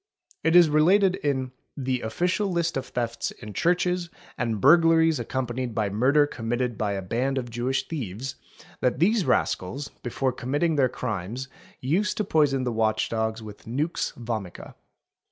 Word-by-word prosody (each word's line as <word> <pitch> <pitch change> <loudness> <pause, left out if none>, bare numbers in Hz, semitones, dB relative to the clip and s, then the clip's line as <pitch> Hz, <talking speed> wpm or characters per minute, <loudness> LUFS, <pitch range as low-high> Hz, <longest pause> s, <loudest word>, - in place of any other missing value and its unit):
It 160 +1 +3
is 175 -2 +8
related 185 +6 +4
in 130 -3 -1 0.3
'"'the 130 -2 -1
Official 180 - 0
list 170 -1 0
of 135 - -3
thefts 120 -1 -2
in 105 -1 -10
churches, 180 - +1 0.3
and 115 -3 -2
burglaries 165 - +5
accompanied 125 -1 -3
by 105 -2 0
murder 135 +8 +4
committed 120 -2 -2
by 105 -1 -1
a 95 -1 -3
band 125 +8 -1
of 120 -2 -3
Jewish 125 +3 -1
thieves'', 130 - -5 0.5
that 125 - +1
these 195 - +3
rascals, 130 +1 0
before 130 +2 -1
committing 145 +7 -1
their 135 -3 +3
crimes 115 +3 -4 0.3
used 185 +9 0
to 215 - +1
poison 145 -8 +2
the 125 - -1
watch 110 -1 +1
dogs 110 0 -2
with 105 -1 -11
nua 145 +9 -2
vomica. 110 -7 -6
130 Hz, 155 wpm, -26 LUFS, 115-160 Hz, 0.5 s, is